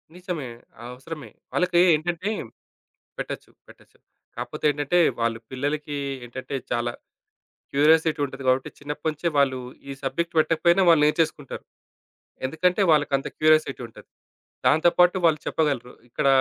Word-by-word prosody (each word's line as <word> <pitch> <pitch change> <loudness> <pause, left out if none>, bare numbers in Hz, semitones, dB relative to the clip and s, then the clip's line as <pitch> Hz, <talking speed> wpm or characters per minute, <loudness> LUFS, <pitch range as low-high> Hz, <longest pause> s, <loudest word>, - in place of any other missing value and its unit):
నిజమే. 180 -7 -5 0.4
అవసరమే. 135 +5 -9 0.2
వాళ్ళకి 180 -1 +2 0.2
ఏంటంటే 175 +5 -2 0.9
పెట్టొచ్చు. - - -6 0.2
పెట్టొచ్చు. - - -20 0.4
కాపోతే - - -5
ఏంటంటే, 145 +4 0 0.2
వాళ్ళు 115 -1 0
పిల్లలకి 145 +3 -3 0.3
ఏంటంటే 130 +3 -6 0.2
చాలా 120 0 0 0.8
క్యూరియాసిటీ 155 +2 +4
ఉంటది 135 0 -8
కాబట్టి 130 +1 +2
చిన్నప్పటినుంచే 150 +3 -3
వాళ్ళు 130 -2 +3 0.3
ఈ - - -3
సబ్జెక్ట్ 165 +6 -2
పెట్టకపోయినా 170 +4 +3
వాళ్ళు 165 -3 +6
నేర్చేసుకుంటారు. 150 -2 -1 0.8
ఎందుకంటే, 180 +6 +1
వాళ్ళకి 145 -2 +2
అంత 135 - -6
క్యూరియాసిటీ 155 -4 +3
ఉంటది. 115 - -16 0.6
దాంతో 160 +3 +5
పాటు 180 +1 +5
వాళ్ళు 155 -2 +3
చెప్పగలరు. 140 -6 -1 0.2
ఇక్కడ 130 - -1
150 Hz, 115 wpm, -24 LUFS, 135-165 Hz, 0.9 s, వాళ్ళు